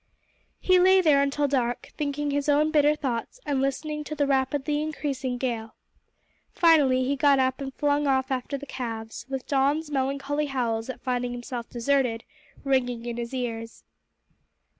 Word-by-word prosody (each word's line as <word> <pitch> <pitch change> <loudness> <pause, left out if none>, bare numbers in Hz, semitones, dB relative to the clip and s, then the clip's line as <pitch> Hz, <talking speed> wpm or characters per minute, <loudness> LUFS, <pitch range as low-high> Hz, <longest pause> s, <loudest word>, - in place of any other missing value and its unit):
He 370 -1 +4
lay 375 +1 +6
there 300 -6 +4
until 280 +1 +1
dark, 245 -3 -1
thinking 290 0 -2
his 285 +1 -1
own 300 +2 +3
bitter 300 -1 +4
thoughts 265 - -4
and 280 -2 0
listening 300 +3 -2
to 305 - -5
the 290 -1 +1
rapidly 280 +2 0
increasing 280 -4 -3
gale. 230 -3 -3 0.7
Finally 290 -7 +4
he 275 +2 0
got 280 0 +4
up 260 +1 +1
and 270 -1 -4
flung 290 0 +1
off 265 -1 +1
after 260 +2 -2
the 280 - -9
calves, 230 -3 -6
with 265 -1 -4
Don's 285 +3 +1
melancholy 280 +2 -1
howls 235 -4 -2
at 260 - -6
finding 245 -1 -1
himself 240 -1 -6
deserted 245 -2 0 0.4
ringing 250 -4 0
in 240 -1 -4
his 235 -1 -4
ears. 230 -3 -5
270 Hz, 160 wpm, -26 LUFS, 250-290 Hz, 0.7 s, lay